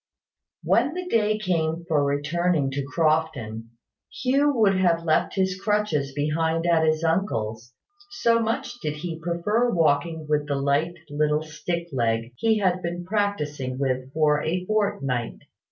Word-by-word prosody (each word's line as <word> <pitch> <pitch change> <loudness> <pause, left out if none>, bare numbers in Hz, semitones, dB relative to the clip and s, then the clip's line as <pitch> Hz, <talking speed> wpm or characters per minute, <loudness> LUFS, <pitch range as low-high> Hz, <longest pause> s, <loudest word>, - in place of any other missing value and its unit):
When 265 +7 +2
the 365 0 -4
day 215 -7 +2
came 170 -4 -1
for 155 -4 +2
returning 145 +1 0
to 140 +1 -2
Crofton, 145 -7 -1 0.4
Hugh 275 +3 +2
would 215 -7 +3
have 175 -3 +2
left 155 -2 +1
his 190 -1 0
crutches 210 -10 0
behind 160 +3 0
at 170 -2 +3
his 155 0 +1
uncle's, 120 - -1 0.4
so 235 -13 +2
much 240 +2 -2
did 150 -4 -2
he 165 +1 -5
prefer 190 +8 0
walking 160 -2 +1
with 150 -1 0
the 145 - -1
little 150 +1 0
light 155 - -5
stick 170 +2 -4
leg 115 -2 -1
he 220 - +2
had 185 -3 +1
been 175 0 -4
practising 150 -11 -2
with 130 -1 -2
for 150 -1 +2
a 180 +3 -2
fortnight. 185 - -1
165 Hz, 145 wpm, -25 LUFS, 145-195 Hz, 0.4 s, would